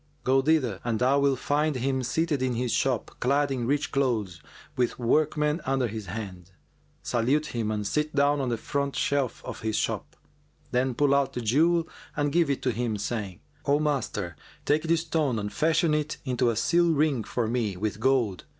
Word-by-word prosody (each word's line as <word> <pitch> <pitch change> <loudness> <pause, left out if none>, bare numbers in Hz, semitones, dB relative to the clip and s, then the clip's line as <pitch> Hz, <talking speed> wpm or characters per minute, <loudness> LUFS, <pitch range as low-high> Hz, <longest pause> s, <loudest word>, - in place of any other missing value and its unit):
Go 135 +1 +3
thither 135 -9 +1
and 115 -2 0
thou 130 +4 +3
wilt 140 -1 +2
find 150 +3 0
him 130 +1 0
seated 150 +3 0
in 130 -2 0
his 125 0 -1
shop, 130 -1 0
clad 140 +2 +2
in 125 -3 -2
rich 145 +2 0
clothes, 110 - -1 0.3
with 125 -1 0
workmen 150 +5 +1
under 135 -2 0
his 110 -2 -6
hand. 95 -2 -7 0.5
Salute 130 +6 +1
him 115 -3 -1
and 105 -1 -2
sit 150 +7 -1
down 145 0 +3
on 130 - -1
the 120 - -1
front 140 +3 -2
shelf 140 -4 -1
of - - -6
his 110 -1 -1
shop;[FN#402] - - -2 0.5
then 125 0 +1
pull 145 +1 +3
out 140 -1 +2
the 125 - -3
jewel 160 +9 +3 0.3
and 145 -1 +1
give 170 -2 +2
it 140 - -1
to 130 - +2
him, 115 -1 -2
saying, 100 -3 -4 0.3
'O 145 +1 +4
master, 125 - -2 0.3
take 150 +2 +3
this 165 0 +1
stone 155 -7 0
and 105 -1 -4
fashion 155 0 +2
it 150 0 -1
into 125 -2 +1
a 115 - 0
seal 170 +9 +3
ring 150 -6 +1
for 120 +3 -2
me 110 -5 -1
with 105 +2 -3
gold. 120 -6 +1
130 Hz, 190 wpm, -27 LUFS, 115-145 Hz, 0.5 s, O